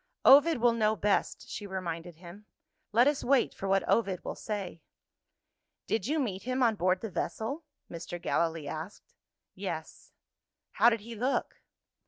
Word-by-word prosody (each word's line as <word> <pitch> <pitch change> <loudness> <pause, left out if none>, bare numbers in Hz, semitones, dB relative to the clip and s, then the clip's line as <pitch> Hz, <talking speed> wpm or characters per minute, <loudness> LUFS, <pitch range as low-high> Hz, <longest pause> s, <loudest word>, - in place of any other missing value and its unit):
"Ovid 290 +4 +7
will 240 0 +3
know 220 -1 +2
best," 205 -1 0
she 205 - -6
reminded 175 -3 -5
him; 180 +5 -13 0.4
"let 235 +4 +5
us 290 -1 +1
wait 270 -1 +3
for 195 - -5
what 195 0 +2
Ovid 195 -6 +1
will - - -3
say." 195 -6 -5 1.0
"Did 220 -2 -1
you 305 +3 0
meet 200 -9 -2
him 255 +1 -1
on 230 -2 +4
board 185 -2 +1
the 225 - -5
vessel?" 275 - -3 0.2
Mr. 175 +1 -7
Gallilee 165 -3 -1
asked. 160 +6 -7 0.4
"Yes." - - -6 0.6
"How 235 - +5
did 230 -2 -1
he 230 +3 -9
look?" 250 +5 -2
210 Hz, 155 wpm, -30 LUFS, 180-240 Hz, 1.0 s, Ovid